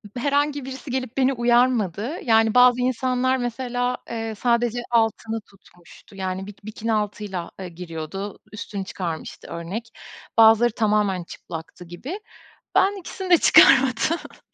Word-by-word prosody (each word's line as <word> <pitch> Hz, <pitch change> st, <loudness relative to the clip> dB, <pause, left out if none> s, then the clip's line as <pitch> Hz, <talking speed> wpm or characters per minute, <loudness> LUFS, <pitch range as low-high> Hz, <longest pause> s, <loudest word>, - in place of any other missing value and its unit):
B -, -, -4 dB
herhangi 285 Hz, +1 st, 0 dB
birisi 265 Hz, 0 st, -7 dB
gelip 255 Hz, -1 st, -3 dB
beni 270 Hz, 0 st, +3 dB
uyarmadı. 240 Hz, -, +1 dB
Yani, 225 Hz, -2 st, +3 dB
bazı 250 Hz, 0 st, +6 dB
insanlar, 255 Hz, +1 st, +1 dB
mesela, 245 Hz, 0 st, -2 dB
eee, 225 Hz, -1 st, -4 dB
sadece 240 Hz, +1 st, +1 dB
altını 225 Hz, -1 st, 0 dB
tutmuştu. 195 Hz, -1 st, -19 dB
Yani, 190 Hz, 0 st, -4 dB
bik 205 Hz, 0 st, -13 dB
bikini 220 Hz, +1 st, -3 dB
altıyla, 210 Hz, -4 st, -3 dB
eee, 185 Hz, -1 st, -6 dB
giriyordu, 175 Hz, +3 st, -7 dB
üstünü 205 Hz, -2 st, -6 dB
çıkarmıştı, 170 Hz, -4 st, -6 dB
örnek. 190 Hz, +8 st, -6 dB, 0.5 s
Bazıları 225 Hz, +1 st, +6 dB
tamamen 210 Hz, -4 st, +1 dB
çıplaktı 170 Hz, +1 st, -9 dB
gibi. 255 Hz, -, -7 dB, 0.6 s
Ben 400 Hz, +1 st, +3 dB
ikisini 375 Hz, +1 st, -7 dB
de 350 Hz, -, +7 dB
çıkarmadım. 270 Hz, +4 st, +4 dB
225 Hz, 130 wpm, -23 LUFS, 195-255 Hz, 0.6 s, de